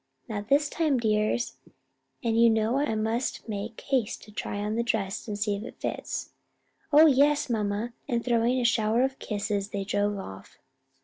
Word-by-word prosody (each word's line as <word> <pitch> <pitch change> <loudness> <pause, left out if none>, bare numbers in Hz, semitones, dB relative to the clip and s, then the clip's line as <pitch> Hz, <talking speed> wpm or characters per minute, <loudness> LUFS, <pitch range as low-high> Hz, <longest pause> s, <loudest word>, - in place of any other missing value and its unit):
"Not 205 -2 -4
this 290 +2 +4
time, 305 -3 +1
dears; 215 0 0 0.7
and 230 -2 +1
you 230 0 +6
know 220 +3 +2
I 285 -6 0
must 225 +5 -2
make 215 +1 -5
haste 255 -6 -1
to 210 - -14
try 205 - -4
on 210 +1 -2
the 230 - +1
dress, 220 -5 -1
to 210 - -4
see 205 0 0
if 200 - -6
it - - -10
fits." - - -4 0.6
"Oh, 305 +2 +8
yes, 290 -1 +4
mamma!" 215 +1 -1
and 235 -1 -1
throwing 240 +1 +2
a - - 0
shower 230 +1 +3
of 265 0 -1
kisses, 205 -1 -2
they 200 -1 -3
drove 205 +1 0
off. 95 - -9
225 Hz, 180 wpm, -27 LUFS, 205-245 Hz, 0.7 s, Oh